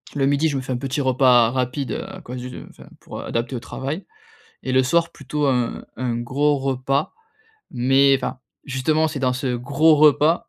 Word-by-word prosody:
Le 135 - +1
midi, 145 +3 +2
je 140 - -2
me - - -2
fais 130 0 -6
un - - -1
petit 135 +3 -2
repas 125 -3 +4
rapide 130 +2 -2 0.2
à 190 -1 -10
cause 125 -3 -8
du 125 0 -8
enfin - - -16
pour - - -8
adapter 115 +3 -3
au 120 - -3
travail. 140 - -5 0.6
Et 130 - -3
le 130 0 +4
soir 170 +6 +1
plutôt 145 +1 -3
un 125 -3 -1
un 125 -1 -2
gros 140 +5 +1
repas. 135 +1 -1 0.6
Mais 135 +3 +4
enfin 130 - -5 0.3
justement 155 +4 0
c'est 145 - -5
dans 130 -1 +1
ce 125 0 -2
gros 140 +6 +3
repas 150 +2 +4
135 Hz, 190 wpm, -22 LUFS, 125-145 Hz, 0.6 s, repas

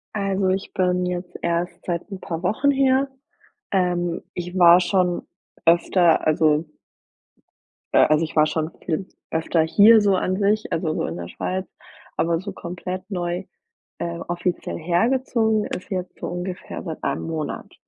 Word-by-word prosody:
Also, 195 -1 0
ich 190 +1 -1
bin 180 -1 +1
jetzt 180 0 -4
erst 170 +1 -2
seit 175 +3 -3
'n 195 - -6
paar 165 +1 -5
Wochen 220 +10 +2
hier. 270 0 +3 0.7
Ähm. 175 -2 0
Ich 180 +1 -5
war 175 0 +8
schon 180 -1 +1 0.4
öfter 170 0 +4
also 155 0 +3 1.3
äh, - - +6
also, 155 +1 +3
ich 160 - -10
war 155 0 +6
schon 160 +1 -2
viel 180 +3 -2 0.2
öfter 160 +1 +1
hier 210 +7 +6
so 200 -2 +3
an 185 0 0
sich, 210 +2 +1
also, 160 -1 0
so - - -1
in 80 - -4
der 85 0 -6
Schweiz. 185 +1 -3 0.5
Aber 165 0 +1
so 200 +2 -6
komplett 180 +2 -6
neu, 180 -1 -3 0.5
äh, 170 0 -3
offiziell 175 +1 -2
hergezogen 220 +5 +1
ist 180 - -6
jetzt 185 -3 -4
so - - -4
ungefähr 180 +1 -5
seit 160 -4 -6
1 - - -1
Monat. 160 -2 -4
180 Hz, 155 wpm, -23 LUFS, 170-195 Hz, 1.3 s, war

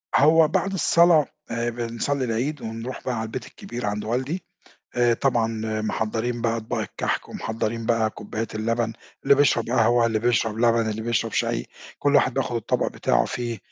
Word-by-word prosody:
هو 160 +2 +6
بعد 195 +5 0
الصلاة 170 -4 +5 0.3
آآ 115 +1 -1
بنصلّي 120 +4 -2
العيد 125 +6 -2
ونروح 115 +3 -6
بقى 125 - -1
على 110 - -2
البيت 115 +2 -5
الكبير 120 0 -7
عند 105 0 -2
والدي، 130 +10 -2 0.5
آآ 120 -1 +4
طبعًا 120 -2 +1 0.3
محضّرين 110 +2 -2
بقى 115 0 +1
أطباق 110 0 -3
الكَحْك - - -3
ومحضّرين 115 +1 -3
بقى 115 -2 +2
كوبايات 110 +1 -6
اللبن 115 +1 -1 0.3
اللي 140 - +6
بيشرب 135 -5 +3
قهوة، 120 -1 +4
اللي 110 -2 +1
بيشرب 115 -2 +1
لبن، 115 -1 +3
اللي 110 +1 -3
بيشرب 115 -1 0
شاي، - - 0 0.3
كل 145 0 +2
واحد 130 -2 +4
بياخُد 130 -2 -1
الطبق 115 - 0
بتاعه - - +1
فيه 120 -2 -3
115 Hz, 165 wpm, -24 LUFS, 115-130 Hz, 0.5 s, هو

